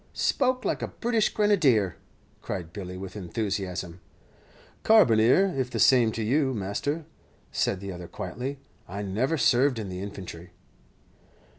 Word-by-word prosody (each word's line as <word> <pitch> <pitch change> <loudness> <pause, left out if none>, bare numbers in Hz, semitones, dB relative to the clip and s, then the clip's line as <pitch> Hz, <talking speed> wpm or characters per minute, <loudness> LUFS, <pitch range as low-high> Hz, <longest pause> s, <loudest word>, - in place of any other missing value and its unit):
"Spoke 255 -1 +1
like - - -1
a - - -2
British 230 -2 0
Grenadier," 145 - +3 0.5
cried 85 -2 -5
Billy, 90 -3 -6
with 95 +1 -8
enthusiasm. 95 -3 -3 0.8
"Carbineer, 180 - +5
if 130 -2 -1
the - - -4
same 120 -4 +5
to 115 - -3
you, 130 +3 +1
master," 115 +11 -2 0.5
said 95 - 0
the 100 -1 -5
other, 90 -1 -8
quietly; 125 +13 -5 0.3
"I 100 +3 -5
never 115 +11 0
served 130 -1 +3
in 105 -3 -4
the 90 0 -5
infantry." 95 -4 -8
110 Hz, 135 wpm, -27 LUFS, 95-140 Hz, 0.8 s, Carbineer